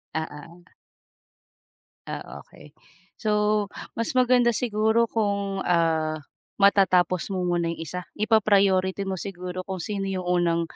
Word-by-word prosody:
Oo. 160 +2 -6 1.4
Ah, - - -7
okey. - - -16 0.5
So, 210 -1 +1 0.3
mas 230 +3 -2
maganda 245 -2 +4
siguro 220 0 +2
kung, 200 -3 -1
ah, 160 -2 +1 0.4
matatapos 190 -2 +3
mo 185 -2 -2
muna 175 -1 0
'yong 170 - -4
isa. 180 +3 -5 0.2
Ipa-priority 200 -3 +3
mo 195 - -2
siguro 180 -1 -5
kung 190 - -4
sino 200 -3 -3
'yong 185 -1 -3
unang, 175 -1 +1
195 Hz, 115 wpm, -25 LUFS, 175-210 Hz, 1.4 s, maganda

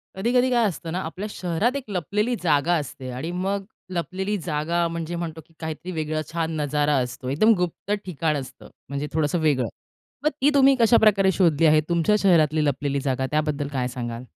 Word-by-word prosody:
कधी-कधी 245 +6 +2
काय 240 -2 +3
असतं 165 -3 -5
ना, 180 - -2
आपल्या 185 +5 -5
शहरात 190 +9 -1
एक 280 - -3
लपलेली 205 +6 -1
जागा 160 0 +3
असते 130 -2 -7
आणि 135 +8 -4
मग 195 +2 -2 0.3
लपलेली 190 +4 -2
जागा 170 +2 0
म्हणजे 170 0 -4
म्हणतो, 165 -2 -5
की 165 - -26
काहीतरी 160 +3 -5
वेगळं 155 -2 -2
छान 165 -1 -1
नजारा 150 0 +1
असतो. 125 0 -3
एकदम 215 +12 +4
गुप्त 180 +2 -3
ठिकाण 160 -3 -1
असतं. 135 -2 -9 0.2
म्हणजे 140 +1 -3
थोडंसं 155 +2 +1
वेगळं. 145 -6 +2 0.6
मग 305 - +4
ती 280 - +5
तुम्ही 275 -1 +6
कशाप्रकारे 215 -4 +5
शोधली 165 -4 +3
आहे? 155 0 +5
तुमच्या 170 +4 +3
शहरातली 155 -5 +3
लपलेली 140 0 0
जागा 130 -1 0
त्याबद्दल 150 -1 0
काय 125 -2 0
सांगाल? 120 -1 -5
165 Hz, 175 wpm, -24 LUFS, 150-190 Hz, 0.6 s, तुम्ही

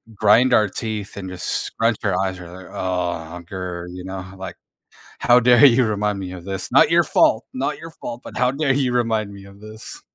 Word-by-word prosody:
grind 125 +5 +4
our 105 -1 +4
teeth 105 0 -5
and 95 -2 -6
just 90 -1 -6 0.2
scratch 115 -1 0
your 95 -3 0
eyes 95 -1 -2
or 90 - -10
there, 90 0 -12
ah, 90 -2 -3
grrr, 90 -1 -6
you 90 0 -8
know, 95 -1 -6
like, 95 -1 -7 0.6
"How 120 +1 +5
dare 125 +3 +6
you 130 -1 +6
remind 105 -1 -1
me 90 -1 -6
of 90 -1 -9
this? 95 -2 -4
Not - - +5
your - - +5
fault. - - +3
Not 140 +3 -2
your 165 0 -9
fault, 120 -5 -8
but - - -9
how 125 0 +2
dare 140 0 0
you 130 -3 0
remind 110 -4 0
me 100 0 -12
of 100 0 -15
this?" 110 +1 -10
100 Hz, 215 wpm, -21 LUFS, 95-120 Hz, 0.6 s, dare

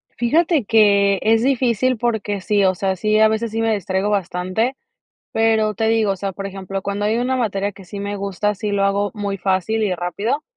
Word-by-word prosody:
Fíjate 305 - +2
que 200 -3 +4
es 225 +1 +3
difícil 255 -1 +1
porque 215 -4 -2
sí, 200 +1 +2
o 185 - +3
sea, 190 +1 -1
sí, 215 +3 +1
a 220 - +6
veces 220 +1 -1
sí 225 +1 -2
me 225 -1 +2
distraigo 190 0 -1
bastante, 195 +5 -1 0.6
pero 220 -1 +2
te 225 +1 0
digo, 225 -3 +2
o - - -5
sea, 195 +1 -4
por 195 +1 -6
ejemplo, 195 0 -5
cuando 200 +1 -3
hay 220 +2 +1
una 255 +2 0
materia 205 -4 -1
que 195 0 -14
sí 200 +3 -8
me 200 0 -4
gusta, 200 +1 -2
sí 210 +1 -4
lo 200 -1 +1
hago 200 +1 +1
muy 200 -2 -3
fácil 195 +3 0
y 200 -4 +1
rápido, 200 - -2
205 Hz, 210 wpm, -20 LUFS, 195-225 Hz, 0.6 s, a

